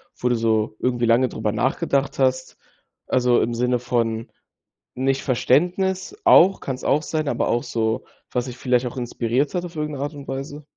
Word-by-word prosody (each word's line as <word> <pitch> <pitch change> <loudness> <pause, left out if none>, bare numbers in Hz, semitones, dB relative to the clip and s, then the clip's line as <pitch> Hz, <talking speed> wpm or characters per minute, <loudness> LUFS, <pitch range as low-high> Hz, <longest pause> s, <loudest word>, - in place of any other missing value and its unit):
Wo 125 - -1
du 120 - +2
so 110 -2 0
irgendwie 120 -1 0
lange 120 +3 +4
darüber 110 -3 -2
nachgedacht 135 +5 0
hast? 130 -1 0 0.5
Also, 125 -1 +3
im 120 - -1
Sinne 125 +1 +1
von 115 -2 -1 0.6
nicht 135 +1 0
Verständnis, 180 - +1
auch, 195 - +6
kann's 130 -1 -5
auch 150 - +2
sein, 155 -1 -2
aber - - 0
auch 120 - 0
so, 110 -1 -1 0.3
was 125 -1 -1
dich 125 -1 -8
vielleicht 125 0 +1
auch 125 - -5
inspiriert 125 +3 -1
hat 180 0 -1
auf 175 -1 -10
irgendeine 150 -2 -3
Art 145 +2 -4
und 140 -1 -10
Weise? 140 +3 -6
130 Hz, 180 wpm, -22 LUFS, 120-145 Hz, 0.6 s, auch